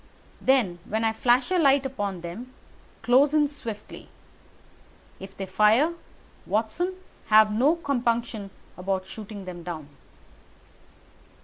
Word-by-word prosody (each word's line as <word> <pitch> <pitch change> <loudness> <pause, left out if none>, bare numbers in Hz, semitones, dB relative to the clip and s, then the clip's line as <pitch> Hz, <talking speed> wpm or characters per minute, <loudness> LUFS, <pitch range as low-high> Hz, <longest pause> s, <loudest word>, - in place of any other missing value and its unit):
Then, 230 -10 +2
when 220 +2 -2
I 225 0 +2
flash 245 +6 +2
a 365 - +3
light 275 -3 +4
upon 205 -9 -3
them, 225 +10 -8 0.5
close 270 +5 +4
in 300 -1 +4
swiftly. 230 -7 -8 1.1
If 195 0 -11
they 195 - -4
fire, 215 - +3 0.5
Watson, 230 - -1 0.3
have 215 0 +6
no 270 +9 +3
compunction 235 -8 -1 0.3
about 190 0 -2
shooting 205 0 -9
them 180 -1 -7
down." 165 -4 -7
220 Hz, 115 wpm, -26 LUFS, 195-270 Hz, 1.1 s, have